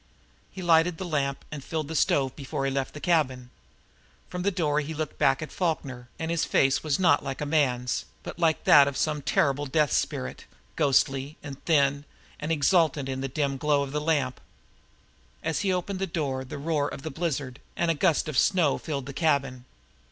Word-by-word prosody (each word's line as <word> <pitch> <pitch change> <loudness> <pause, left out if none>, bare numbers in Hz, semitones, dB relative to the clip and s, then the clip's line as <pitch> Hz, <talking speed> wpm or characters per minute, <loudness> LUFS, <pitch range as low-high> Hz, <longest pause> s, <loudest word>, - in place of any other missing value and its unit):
He 190 - -7
lighted 165 0 +4
the 185 - -5
lamp 140 -4 -2
and 150 -3 -6
filled 155 -1 -3
the 160 - -5
stove 135 -3 +2
before 135 0 -4
he 135 - 0
left 135 +1 -2
the - - -6
cabin. 130 -8 0 0.8
From 180 - -4
the 195 - +2
door 155 -6 0
he 155 +1 -4
looked 155 -1 -4
back 135 +3 +3
at 155 - -8
Falkner, 135 -8 -3
and 160 +1 -3
his 170 -2 +1
face 135 0 +2
was 155 -3 +1
not 175 -6 +3
like 135 -1 -4
a 150 - -2
man's, 130 -5 0 0.2
but - - -8
like 165 -2 +2
that 140 -1 +7
of 140 - -3
some 150 -2 0
terrible 145 +1 +1
death 150 +2 +2
spirit, 65 +1 -2 0.3
ghostly, 135 0 +1
and 140 -2 -9
thin, 140 -3 +2 0.3
and 155 +2 -3
exultant 155 -3 +2
in 130 0 -3
the 135 - -2
dim 140 0 -1
glow 145 +1 +2
of 135 - -6
the 150 +1 -2
lamp. 145 -5 0 1.0
As 160 -3 -1
he 195 - +1
opened 185 +1 -2
the 195 - -1
door 145 -7 -2
the 130 - -7
roar 145 0 0
of 135 - -8
the 160 - -4
blizzard 140 -5 -3 0.2
and 170 -1 +1
a - - +2
gust 160 0 +1
of 150 -5 +1
snow 170 -7 +2
filled 140 -5 -4
the 140 - -7
cabin. 135 -4 0
145 Hz, 200 wpm, -27 LUFS, 135-160 Hz, 1.0 s, that